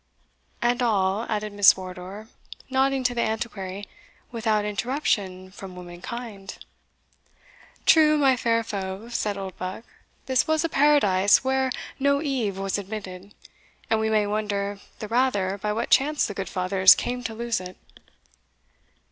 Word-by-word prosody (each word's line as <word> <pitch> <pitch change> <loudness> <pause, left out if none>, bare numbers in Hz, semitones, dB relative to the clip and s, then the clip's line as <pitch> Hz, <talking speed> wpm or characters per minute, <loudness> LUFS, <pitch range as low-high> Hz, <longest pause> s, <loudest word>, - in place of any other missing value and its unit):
"And 240 +1 +2
all," 205 -2 +1
added 210 -1 -2
Miss 205 -1 +6
Wardour, 185 +3 -8 0.4
nodding 270 0 +2
to 245 0 +1
the 235 - -1
Antiquary, 205 -3 -3 0.5
"without 220 -3 0
interruption 205 -5 -2
from 190 -1 -10
womankind." 195 +3 -8 1.3
"True, 305 -1 +6
my 270 -3 +4
fair 230 -1 +1
foe," 195 +1 -5
said 210 -4 -2
Oldbuck; 190 +1 -6 0.4
"this 260 -1 +1
was 315 0 +2
a 330 - 0
paradise 240 -11 +4
where 265 0 +1 0.3
no 280 +1 +2
Eve 255 -10 -2
was 195 0 -2
admitted, 200 -1 -8 0.6
and 220 - +3
we 220 0 0
may 215 -1 +2
wonder 205 -1 -2 0.2
the 215 - -6
rather 205 -5 +1
by 210 +1 -2
what 225 +3 -3
chance 295 +2 +3
the 205 - -4
good 195 -1 -5
fathers 185 0 +5
came 245 0 -3
to 225 - -4
lose 235 -1 -1
it." 185 0 -9
215 Hz, 140 wpm, -25 LUFS, 195-245 Hz, 1.3 s, Miss